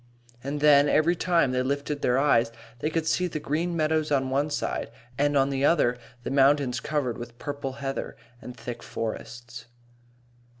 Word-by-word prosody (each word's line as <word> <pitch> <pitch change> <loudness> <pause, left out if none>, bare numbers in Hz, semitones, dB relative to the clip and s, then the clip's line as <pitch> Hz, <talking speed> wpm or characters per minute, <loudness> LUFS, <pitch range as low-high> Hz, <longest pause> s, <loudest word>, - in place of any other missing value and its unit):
And 145 +2 -3
then, 145 -1 +6
every 155 +5 +3
time 165 -6 +2
they 125 0 +1
lifted 140 +2 -2
their 125 +1 +2
eyes 125 -5 +3 0.3
they 150 - -1
could 160 0 -1
see 180 +3 +1
the 155 -3 -4
green 165 +4 -1
meadows 155 -1 +1
on 135 -2 +1
one 140 +3 +1
side, 145 - -2 0.3
and 145 +2 +2
on 135 0 +3
the 135 0 -1
other 140 -6 +3 0.3
the - - -4
mountains 135 -1 +3
covered 145 -6 -2
with 120 0 -9
purple 140 -1 -5
heather 135 0 -5 0.2
and 125 -1 -9
thick 120 +1 -7
forests. 115 +1 -6
140 Hz, 170 wpm, -26 LUFS, 125-150 Hz, 0.3 s, then